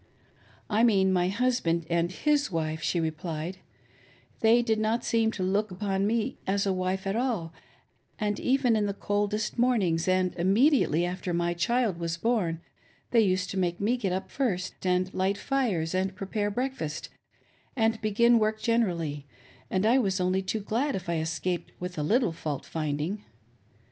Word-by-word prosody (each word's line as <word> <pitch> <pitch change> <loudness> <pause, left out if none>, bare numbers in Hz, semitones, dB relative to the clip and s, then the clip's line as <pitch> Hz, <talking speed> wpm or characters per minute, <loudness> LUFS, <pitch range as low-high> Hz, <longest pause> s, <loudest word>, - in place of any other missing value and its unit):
" - - -33 0.3
I 220 +1 +2
mean 190 -5 +4
my 180 -1 +2
husband 195 -6 0
and 170 +1 +1
his 290 +3 +1
wife," 160 -1 -2
she 175 - 0
replied; 160 +2 -3 0.4
" - - -30
They 230 +2 +5
did 220 -2 +1
not 220 +2 0
seem 225 -1 +2
to 190 - -3
look 200 +4 +1
upon 195 +1 -1
me 230 +3 -1
as 200 +1 +1
a 195 - +1
wife 185 +1 -2
at 195 +1 -1
all, 225 -10 -1 0.6
and, 210 -2 -1
even 255 -3 +2
in 210 -1 +1
the 200 - -3
coldest 205 +3 -1
mornings 190 -10 +2
and 185 0 +2
immediately 195 - +3
after 180 0 -3
my 175 0 0
child 205 +2 0
was 170 0 -2
born, 180 -6 0 0.5
they 230 - +5
used 185 -3 +1
to 195 - -2
make 175 -1 0
me 220 +5 +2
get 205 -7 -2
up 185 +1 -3
first 195 -9 -2
and 185 +1 +1
light 190 +2 0
fires 205 -14 0
and 190 +1 -1
pre 195 - -5
pare 205 +1 -1
breakfast 225 - -3 0.7
and 225 -2 +1
begin 230 +2 +4
work 215 0 0
generally, 170 -12 0 0.4
and 190 +2 0
I 240 +4 +5
was 195 -5 0
only 185 +1 +1
too 210 +3 -2
glad 250 +8 -1
if 185 -2 -5
I 170 -1 0
escaped 165 +3 -3
with 180 0 -5
a - - 0
little 220 - +2
fault 150 -3 -4
finding. 155 +6 -3
195 Hz, 175 wpm, -28 LUFS, 175-225 Hz, 0.7 s, They